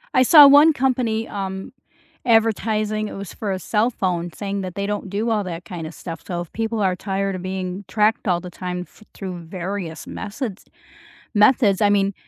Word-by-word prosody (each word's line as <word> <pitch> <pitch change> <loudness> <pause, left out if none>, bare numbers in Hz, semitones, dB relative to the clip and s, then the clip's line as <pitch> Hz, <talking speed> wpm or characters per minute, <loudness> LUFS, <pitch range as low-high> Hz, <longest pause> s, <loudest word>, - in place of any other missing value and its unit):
I - - +6
saw 290 +3 +9
one 290 +3 +7
company, 245 -4 0
um, 190 0 -5 0.5
advertising 215 -2 +1
it - - -8
was 195 -2 -7
for 205 -3 -4
a 190 - -2
cell 215 +5 +1
phone 175 -6 -2
saying 200 +2 -4
that 185 -2 -6
they 200 - -2
don't 205 -1 -3
do 210 +4 -1
all 215 -2 +1
that 175 -1 -6
kinda 165 -3 -6
stuff. 165 +1 -8
So 175 -1 -3
if 175 - -10
people 225 0 -2
are 190 -2 +2
tired 195 +1 -2
of 185 - -6
being 185 +1 -4
tracked 215 +2 +1
all 175 -2 +2
the 180 0 -9
time 180 0 -5
th 215 - -20
through 185 -3 -6
various 175 0 -6
methods 215 -1 -5 0.7
methods. 210 -2 +4
I 205 - +5
mean, 200 -1 +2
200 Hz, 190 wpm, -22 LUFS, 185-220 Hz, 0.7 s, saw